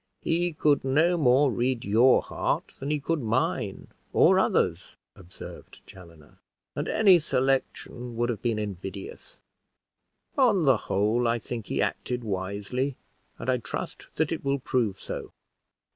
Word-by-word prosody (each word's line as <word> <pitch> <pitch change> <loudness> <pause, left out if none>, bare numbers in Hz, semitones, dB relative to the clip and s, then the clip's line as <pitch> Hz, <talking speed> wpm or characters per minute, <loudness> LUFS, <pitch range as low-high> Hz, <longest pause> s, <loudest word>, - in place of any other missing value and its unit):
"He 170 +1 0
could 150 -1 +2
no 155 +7 +3
more 140 -2 +4
read 125 0 -1
your 115 +6 +5
heart, - - -2
than 135 - -4
he 150 0 0
could 155 +2 -1
mine 115 -1 -1 0.2
or - - +5
others," - - 0 0.2
observed 90 -1 -12
Chaloner; 85 -5 -16 0.4
"and - - -3
any 195 -5 +5
selection 130 -4 -1
would 120 +1 0
have 115 - -3
been 115 -3 0
invidious: 95 -2 -7 1.0
on 225 - +4
the 135 -4 +5
whole, 110 +4 0
I 115 +1 +2
think 115 -1 -6
he - - 0
acted 125 -1 -3
wisely, 105 +7 -3 0.4
and - - -8
I 130 -1 +2
trust 110 -2 -6
that 160 -1 0
it 165 - -3
will 140 0 +1
prove 120 -7 -1
so. - - -7
125 Hz, 145 wpm, -27 LUFS, 105-140 Hz, 1.0 s, your